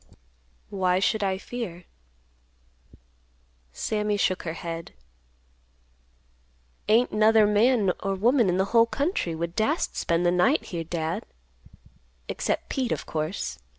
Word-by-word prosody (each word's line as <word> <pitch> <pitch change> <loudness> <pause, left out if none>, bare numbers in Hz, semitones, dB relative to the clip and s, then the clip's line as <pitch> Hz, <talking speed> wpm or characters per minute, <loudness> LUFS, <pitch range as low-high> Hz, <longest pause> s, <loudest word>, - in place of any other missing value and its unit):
"Why 185 -2 +1
should 205 +3 +1
I 190 -1 0
fear?" 190 -5 -6 1.9
Sammy 210 - -1
shook 185 -2 +1
her - - -3
head. 165 0 -6 2.0
"Ain't 230 +3 +4
'nother 215 0 +5
man 210 -1 +3
or 195 0 -2
woman 235 +2 +3
in 180 - +1
the 190 - +2
whole 230 0 +6
country 280 - -1
would 170 +1 -4
dast 285 +10 0
spend 170 +1 0
the 175 - +4
night 180 - +3
here, 170 -2 -4
Dad; 165 +5 -3 1.0
except - - -2
Pete, 260 -4 -2
of - - -2
course. 155 - -3
195 Hz, 120 wpm, -26 LUFS, 175-225 Hz, 2.0 s, whole